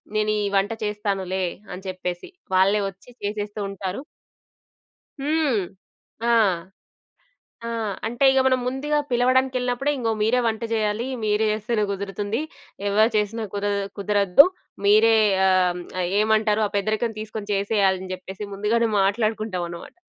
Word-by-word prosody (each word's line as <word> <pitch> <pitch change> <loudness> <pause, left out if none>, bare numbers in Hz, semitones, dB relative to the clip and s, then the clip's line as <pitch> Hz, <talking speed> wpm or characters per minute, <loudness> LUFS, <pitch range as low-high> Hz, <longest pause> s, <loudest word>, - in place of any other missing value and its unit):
"నేనీ 215 0 +1 0.2
వంట 195 +2 +2
చేస్తానులే" 195 -3 -2 0.3
అని 185 +2 -9
చెప్పేసి. 180 -1 -4 0.3
వాళ్ళే 195 +3 +4
వచ్చి 195 +5 -17
చేసేస్తూ 205 0 -3
ఉంటారు. 195 +3 -5 1.2
హ్మ్. 290 -6 +1 0.7
ఆ! - - +4 1.4
ఆ! - - -3 0.4
అంటే, 240 +4 0
ఇగ 265 - +3
మనం 260 -1 +3
ముందుగా 285 +4 0
పిలవడానికెళ్ళినప్పుడే, 255 +1 +1
ఇంగో 230 -4 -1
మీరే 235 +4 +3
వంట 220 -1 -1
జేయాలీ, 215 +1 0 0.2
మీరు 210 +1 +2
జేస్తేనే 215 +1 0
కుదురుతుంది. 200 +3 -3 0.5
ఎవరు 215 +3 +4
చేసినా 215 +2 -1
కుదదు 205 0 0 0.2
కుదరద్దు, 200 - +5 0.4
మీరే 215 +2 +6 0.3
ఆ! - - +5 0.3
హ్మ్, 180 - -6 0.2
ఆహ్, 175 - 0
ఏమంటారు! 215 0 +2
ఆ - - -3
పెద్దరికం 215 +3 0
తీసుకొని 215 -1 -6
చేసేయాలని 195 -2 +1
జెప్పేసి, 190 +2 -8
ముందుగానే 225 +3 +1
మాట్లాడుకుంటామనమాట. 195 -4 -1
210 Hz, 120 wpm, -23 LUFS, 195-230 Hz, 1.4 s, మీరే